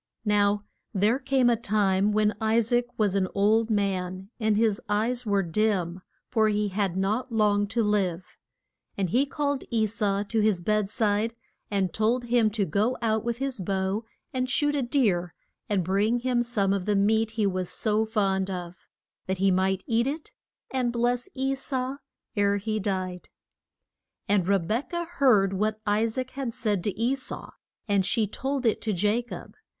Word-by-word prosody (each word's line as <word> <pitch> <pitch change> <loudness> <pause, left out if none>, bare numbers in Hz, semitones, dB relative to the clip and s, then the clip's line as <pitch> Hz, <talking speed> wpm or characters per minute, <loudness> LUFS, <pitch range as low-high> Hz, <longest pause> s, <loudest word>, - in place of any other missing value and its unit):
Now 205 0 +2 0.3
there 210 +7 +3
came 265 -3 +2
a 240 - +4
time 205 -3 +1
when 210 0 +2
I 220 +1 +2
saac 240 +2 +1
was 210 -3 +2
an 195 -2 +1
old 215 +3 +3
man, 190 -2 -1
and 215 -2 +2
his 220 -2 +2
eyes 230 +3 0
were 200 -1 +2
dim, 185 -1 0 0.3
for 220 -3 +2
he 210 0 0
had 190 -2 -1
not 215 +7 -1
long 205 -2 +2
to 225 +2 +1
live. 185 -4 -1 0.6
And 190 -4 -1
he 270 +4 +3
called 285 -1 -1
E 225 -2 +2
sau 205 -1 0
to 220 +2 -1
his 210 -4 +3
bed 210 +1 +1
side 215 +1 0 0.3
and 195 -4 0
told 230 +3 +1
him 235 -2 +3
to 210 -1 -1
go 210 +9 0
out 220 -1 +1
with 235 0 -2
his 270 -3 -3
bow 190 +3 -1 0.3
and 255 0 -1
shoot 290 +2 +2
a 285 - 0
deer 215 - +1 0.3
and 200 -3 +1
bring 205 +7 +1
him 250 -1 +1
some 210 -5 +1
of 195 -2 -2
the 210 - +1
meat 220 +3 +2
he 215 - +2
was 185 -2 -1
so 215 0 +1
fond 195 -3 0
of, 180 -2 -7 0.4
that 190 0 -1
he 195 +1 +3
might 190 +1 +1
eat 235 +1 +1
it 300 +3 -4 0.4
and 255 -2 0
bless 240 +4 0
E 270 0 0
sau 265 0 -3 0.4
ere 200 -1 +2
he 215 +2 -2
died. 185 -3 -3 1.0
And 195 -3 +2
Re 200 0 +4
bek 215 - -2
ah 345 0 -1
heard 240 - +3
what 215 +2 -1
I 210 +1 +2
saac 255 +3 -3
had 260 -4 -4
said 205 -5 0
to 205 0 -2
E 240 +3 +2
sau, 265 - -7 0.4
and 200 -2 +2
she 215 +3 +1
told 265 +5 -3
it 225 - +2
to 220 - -1
Ja 205 +6 +2
cob. 240 - -9
215 Hz, 180 wpm, -26 LUFS, 195-235 Hz, 1.0 s, a